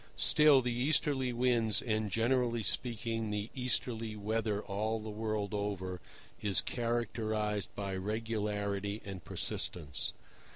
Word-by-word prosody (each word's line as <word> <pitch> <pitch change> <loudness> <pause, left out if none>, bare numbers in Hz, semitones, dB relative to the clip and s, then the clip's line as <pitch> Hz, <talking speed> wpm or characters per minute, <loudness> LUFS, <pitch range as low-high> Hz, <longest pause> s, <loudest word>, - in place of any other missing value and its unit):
Still, 150 -4 +6
the 120 -1 0
easterly 130 0 +2
winds, 120 -3 +2
and, 110 -3 0
generally 120 +2 +1
speaking, 115 -1 -1
the 105 +1 -3
easterly 115 -3 -1
weather 105 0 -1
all 110 +3 -1
the 110 0 -6
world 110 -1 -2
over, 95 -3 -2 0.4
is 100 -2 +3
characterized 110 -3 -1
by 100 -1 -3
regularity 105 0 -2
and 95 -3 -6
persistence. 75 -5 -2
110 Hz, 115 wpm, -33 LUFS, 105-120 Hz, 0.4 s, Still